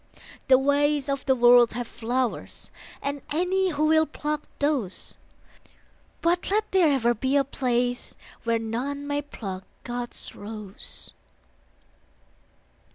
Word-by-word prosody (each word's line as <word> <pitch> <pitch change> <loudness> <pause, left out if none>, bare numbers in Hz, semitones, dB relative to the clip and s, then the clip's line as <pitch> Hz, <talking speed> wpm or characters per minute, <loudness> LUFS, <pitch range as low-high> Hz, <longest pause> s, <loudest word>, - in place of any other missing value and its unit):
The 260 -2 +7
ways 285 +1 +2
of 275 0 -2
the 265 - +5
World 240 -1 +6
have 245 +1 -3
flowers, 240 +2 -3 0.3
And 285 0 -2
any 365 +4 +2
who 305 -2 +1
will 315 0 +4
pluck 300 0 -3 0.2
those; 285 -10 -1 1.1
But 345 +1 +1
let 425 +3 0
there 365 -5 +5
ever 240 -4 +3
be 260 +4 0
a 280 - +5
place 245 -2 -1 0.3
Where 230 0 +2
none 250 +6 -3
may 290 0 -1
pluck 195 -10 -7 0.2
God's 245 0 -4
rose. 210 -2 -6
270 Hz, 120 wpm, -26 LUFS, 240-295 Hz, 1.1 s, The